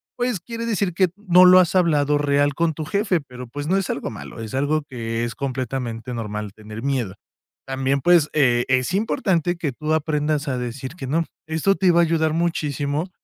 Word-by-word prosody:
pues 245 -5 -1
quiere 230 +5 -6
decir 200 -5 0
que 185 +1 +2
no 185 -3 +5
lo 185 0 +8
has 175 -2 +3
hablado 150 -5 +3
real 145 0 +2
con 165 0 +1
tu 155 +1 -5
jefe, 200 -1 0
pero 125 -2 -10
pues 145 +5 -6
no 185 - +2
es 195 - -2
algo 140 - -3
malo. - - -9
Es 110 -2 -7
algo 145 +3 +1
que 115 -2 -3
es 120 - -4
completamente 125 -3 -4
normal 105 -3 -5
tener 110 +2 -9
miedo. 130 -9 -1 0.5
También, 135 +1 0
pues, 170 -1 +4
eh, 125 -5 +3
es 130 +4 +1
importante 190 - +1
que 155 -5 -2
tú 155 +4 -2
aprendas 150 -1 0
a 130 - -1
decir 130 +3 -5
que 135 -7 -7
no. 165 +5 +1 0.2
Esto 160 +5 +1
te 185 -2 +3
va 170 0 +4
a - - +5
ayudar 160 -1 +1
muchísimo 155 -1 -1
150 Hz, 200 wpm, -22 LUFS, 130-175 Hz, 0.5 s, lo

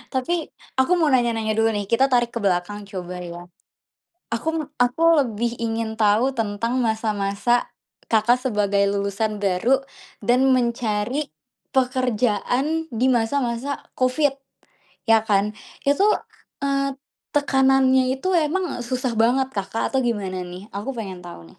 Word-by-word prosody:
Tapi, 260 +7 +1 0.5
aku 260 - 0
mau 315 -3 +3
nanya-nanya 230 -3 +1
dulu, 225 0 +4
nih. 205 -1 -2
Kita 235 +3 +4
tarik 240 -1 +3
ke 235 - -2
belakang, 185 +2 0
coba, 180 -2 -6 0.2
ya. 175 0 -8 0.9
Aku 235 +7 -3
me 315 - -2 0.2
aku 245 +7 -4 0.2
lebih 235 0 -2 0.2
ingin 225 0 -2
tahu 210 +4 +4
tentang 220 +2 -2
masa-masa 215 +1 0 0.6
Kakak 225 +3 +4
sebagai 205 -4 +1
lulusan 200 +2 -1
baru 200 +8 +3 0.5
dan 245 +1 +5
mencari 235 +1 0 0.5
pekerjaan 250 -1 +1 0.3
di - - +3
masa-masa 240 +2 -1 0.3
Covid, 265 +3 +2 0.8
ya, 225 - +7
kan. 200 -1 +4 0.4
Itu, 335 +9 +4 0.6
eee, 275 0 +1 0.5
tekanannya 265 -2 +4
itu 270 +7 -4 0.2
emang 375 +5 -1 0.2
susah 255 -1 -1
banget, 260 +3 +2
Kakak, 200 +3 -2
atau 265 - +1
gimana, 195 -5 -2
nih? 180 +2 -9
Aku 205 +6 -3
pengen 190 -5 -6
tahu, 175 - -9
nih. - - -32
235 Hz, 130 wpm, -23 LUFS, 205-260 Hz, 0.9 s, ya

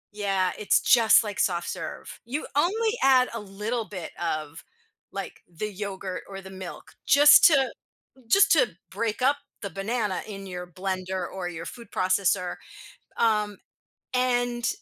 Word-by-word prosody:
yeah, 195 -3 0
it's 210 - +3
just 230 -2 +5
like 205 -2 -5
soft 175 -2 0
serve. - - -7
You 270 +6 -3
only 430 +9 +2
add 260 -2 +5
a 230 - -3
little 210 +4 -4
bit 185 -5 -7
of, 155 -1 -3 0.5
like, - - -7
the 210 +6 -5
yogurt 190 -2 -5
or 195 0 -7
the 190 0 -11
milk 190 -1 -9 0.2
just 290 +1 +8
to, 275 -5 +5 0.6
just 395 - +5
to - - +5 0.2
break 230 +1 -2
up 280 +2 +4 0.3
the 200 - -4
banana 205 +1 -2
in 195 -2 -8
your 180 -1 -6
blender 185 0 -3
or 185 -2 -5
your 165 -1 -7
food 235 +4 -9
processor. 185 -1 +1 0.6
Um, 210 -3 +1 0.6
and 245 -1 +1
205 Hz, 145 wpm, -26 LUFS, 185-245 Hz, 0.6 s, just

